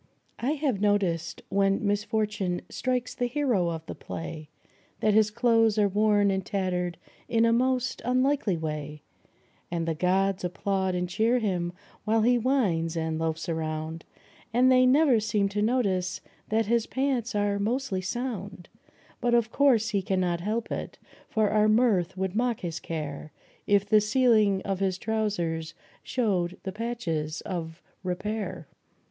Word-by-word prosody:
I 265 +5 0
have 275 -9 -1
noticed 185 -6 0
when 195 +1 +1
misfortune 205 -3 -1
strikes 250 -1 -2
the 245 - -1
hero 245 - +1
of 165 -1 -5
the - - -6
play 155 -2 -7 0.5
That 215 - +2
his 215 0 +4
clothes 225 -1 +3
are 210 -1 +4
worn 205 0 +3
and 190 0 -1
tattered 180 -3 -2 0.3
in 230 0 +3
a 230 - +4
most 255 +1 0
unlikely 255 -6 +1
way; 150 -1 -5 0.7
And 170 -1 -2
the 165 - +1
gods 190 +4 +1
applaud 190 +1 -1
and 180 0 -1
cheer 220 +7 +2
him 180 -7 -1 0.3
while 220 +1 +2
he 245 +1 +4
whines 190 -11 +1
and 160 -1 -1
loafs 160 0 -2
around, 160 0 -3 0.5
But 250 +3 +4
they 255 0 +5
never 270 -2 +5
seem 210 -2 0
to 205 +1 -2
notice 200 -6 0 0.3
that 220 +1 +2
his 230 +1 +1
pants 260 -4 -1
are 205 0 +1
mostly 225 -2 -1
sound; 200 -3 -5 0.5
Yet, 240 0 +3
of 235 -1 +2
course, 245 -6 +3
he 200 -2 0
cannot 180 -2 0
help 220 +4 -2
it, - - -4 0.3
for 215 -2 +1
our 215 0 +4
mirth 215 -6 +2
would 190 0 -2
mock 240 0 0
his 165 -2 -4
care 155 -2 -5 0.4
If 200 -1 +3
the 215 +1 +4
ceiling 215 -3 +3
of 195 -2 -2
his 190 -2 0
trousers 185 -8 -2 0.3
showed 185 -8 -1
the 190 - -3
patches 180 -9 -3
of 170 -3 -5 0.2
repair. 185 -2 -3
205 Hz, 150 wpm, -27 LUFS, 180-230 Hz, 0.7 s, they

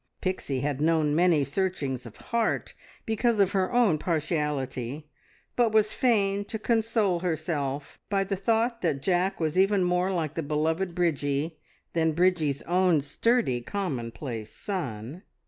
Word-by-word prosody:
Pixie 165 -8 -2
had 145 0 -2
known 155 -2 +2
many 170 -3 +4
searchings 140 -6 -2
of 115 - -13
heart 235 -2 -1 0.3
because 225 0 +1
of 195 -2 +4
her 190 -2 +1
own 230 -11 +3
partiality, 150 -4 -2 0.4
but 235 -2 +3
was 215 -1 +3
fain 205 -5 +2
to 220 - -4
console 220 -4 +1
herself 150 -5 -3
by 200 -1 +2
the 195 0 -2
thought 230 +4 0
that 145 -6 -1
Jack 185 +1 +1
was 160 +2 0
even 195 0 +4
more 180 +1 +1
like 160 -5 -1
the 165 - -2
beloved 160 +4 -1
Bridgie 150 -2 0 0.3
than 160 -1 +2
Bridgie's 165 -5 +1
own 180 -2 +3
sturdy, 145 - +1
commonplace 120 - -4
son. 140 - -5
170 Hz, 140 wpm, -27 LUFS, 145-195 Hz, 0.4 s, many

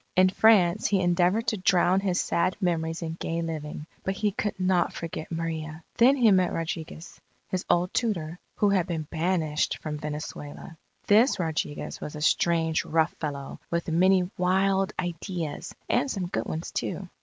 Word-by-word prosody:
In 185 0 +6
France 195 -2 +4
he 200 - +2
endeavoured 180 +5 +2
to 220 - -2
drown 185 0 +3
his 190 -2 0
sad 185 +2 0
memories 165 -3 -1
in 165 0 -4
gay 165 0 -2
living, 150 -2 -5 0.2
but 190 - -1
he 210 +1 0
could 205 0 -3
not 185 -1 +2
forget 165 -1 -6
Maria. 160 -1 -4
Then 255 +4 +6
he 235 -5 +5
met 185 -2 +3
Rodriguez, 165 0 -5 0.3
his 185 -1 -2
old 175 +1 +2
tutor, 175 -8 -1 0.2
who 205 - +2
had 190 -3 +2
been 165 -3 -2
banished 160 -2 0
from 150 -1 -5
Venezuela. 150 +1 -7 0.3
This 225 +6 +5
Rodriguez 160 -4 -3
was 150 - -6
a 150 - -6
strange, 160 0 +2
rough 160 +1 +1
fellow, 140 -3 -5
with 170 0 -2
many 180 +2 +4
wild 190 +2 +2
ideas 175 -2 -4
and - - +1
some 195 -7 -2
good 175 - -3
ones 160 +2 -4
too. 195 - -3
175 Hz, 165 wpm, -27 LUFS, 160-190 Hz, 0.3 s, In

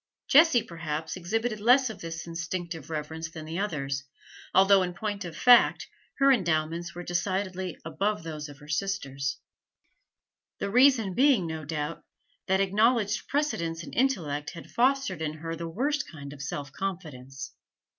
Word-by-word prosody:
Jessie, 285 -5 +6
perhaps, 160 -4 -4
exhibited 215 +5 -2
less 250 +3 +5
of - - -11
this 165 0 -5
instinctive 170 -2 -5
reverence 160 +1 -4
than 160 -2 -8
the 165 +3 -4
others, 140 -9 -2 0.5
although, 195 0 +6
in 180 -1 -2
point 205 +1 -3
of 165 -2 -7
fact, 245 -1 +6 0.3
her 275 0 +5
endowments 170 -5 0
were 175 - -6
decidedly 185 0 -2
above 165 +3 -1
those 155 -2 -6
of 145 - -11
her 150 0 -15
sisters; 145 -6 -2 1.2
the 200 - -3
reason 250 -5 +5
being, 255 -5 +4
no 160 -1 -5
doubt, 150 +1 -4 0.4
that 190 0 +3
acknowledged 210 +2 +2
precedence 170 - -1
in - - -10
intellect 160 - 0
had 165 - -10
fostered 255 - +1
in 155 -1 -2
her 165 +1 -5
the 165 0 -5
worst 290 - -1
kind 140 -3 -9
of 140 - -10
self 140 0 -5
confidence. 150 -9 -6
175 Hz, 150 wpm, -28 LUFS, 155-210 Hz, 1.2 s, Jessie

